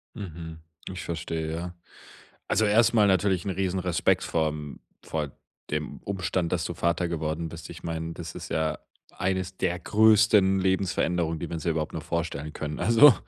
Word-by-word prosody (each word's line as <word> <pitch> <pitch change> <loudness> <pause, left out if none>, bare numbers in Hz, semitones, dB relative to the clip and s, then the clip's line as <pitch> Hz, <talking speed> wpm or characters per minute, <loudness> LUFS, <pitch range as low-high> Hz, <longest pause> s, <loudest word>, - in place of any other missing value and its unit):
Mhm, 80 -5 -7 0.3
ich 95 - -6
verstehe, 80 -1 -3
ja. 85 +1 -5 0.7
Also 110 - +3
erstmal 110 0 +5
natürlich 95 -1 +2
'n - - -1
Riesenrespekt 90 -2 +1
vorm 75 -3 -2 0.2
vor 75 -3 -3 0.4
dem 75 0 -3
Umstand, 95 -3 -1
dass 85 -3 0
du 85 - -3
Vater 85 +2 0
geworden 80 0 -2
bist. 85 0 -9
Ich 80 - -10
meine, 80 0 -3
das 85 +1 -7
ist 85 - -7
ja 80 -1 0 0.3
eines 95 0 -2
der 90 0 0
größten 105 -3 +5
Lebensveränderungen, 90 -3 +1
die 85 - -4
man 85 - -4
sich 85 +2 0
überhaupt 80 -1 -2
noch - - -4
vorstellen 75 +2 -3
können. 75 0 -4
Also, 120 +4 +8
85 Hz, 160 wpm, -27 LUFS, 80-95 Hz, 0.7 s, Also